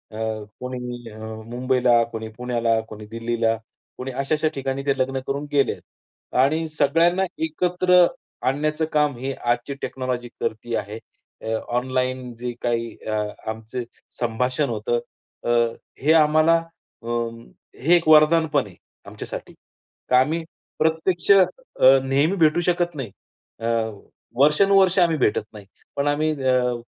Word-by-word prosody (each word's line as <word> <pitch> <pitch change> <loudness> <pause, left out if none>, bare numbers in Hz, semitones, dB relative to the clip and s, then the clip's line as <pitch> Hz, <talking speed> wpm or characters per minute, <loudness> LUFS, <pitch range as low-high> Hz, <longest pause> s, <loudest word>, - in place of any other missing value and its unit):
अ, 110 -1 -3 0.2
कोणी 125 -2 -6
अ, 105 - -12 0.3
मुंबईला, 125 0 +2
कोणी 110 0 -5
पुण्याला, 120 -2 0
कोणी 105 0 -9
दिल्लीला, 115 0 0 0.4
कोणी 130 +1 -5
अशा-अशा 145 +4 0
ठिकाणी 135 0 -3
ते 140 -1 +1
लग्न 135 0 0
करून 140 +2 -2
गेलेत. 140 -2 +1 0.6
आणि 155 +4 +2
सगळ्यांना 170 +6 +3 0.2
एकत्र 180 +2 +3 0.4
आणण्याचं 150 +4 0
काम 150 -2 +2
हे 135 +2 -3 0.2
आजची 120 +3 -2
टेक्नॉलॉजी 125 -2 -3
करती 115 +2 -2
आहे. 105 +2 -4 0.4
अ, 110 - -3 0.2
ऑनलाईन 130 0 -2
जे 125 0 -3
काही 115 -1 -1
अ, 110 - -1 0.4
आमचे 110 +3 -5 0.4
संभाषण 125 +4 0
होतं 115 +1 -1 0.4
अ, - - -2 0.5
हे 155 +4 +4
आम्हाला 155 +2 +4 0.5
अ, - - -9 0.7
हे 165 +7 +4
एक 170 -2 +1
वरदान 155 +1 +6
पण - - +3
आहे - - -15 0.3
आमच्यासाठी. - - -8 0.6
का 125 - +6
आम्ही 160 +6 +1 0.4
प्रत्यक्ष 160 +4 +1
अ, 195 -2 +8 0.6
नेहमी 140 +7 +2
भेटू 160 0 +4
शकत 175 -1 -1
नाही. 130 -8 -5 0.5
अ, 115 - -5 0.7
वर्षानुवर्षे 190 +6 +5
आम्ही 165 -2 +3
भेटत 125 -7 +1
नाही. 105 -2 -11 0.3
पण 140 +1 0
आम्ही 150 +2 +1
अ, 125 -1 +2
130 Hz, 130 wpm, -23 LUFS, 120-155 Hz, 0.7 s, अ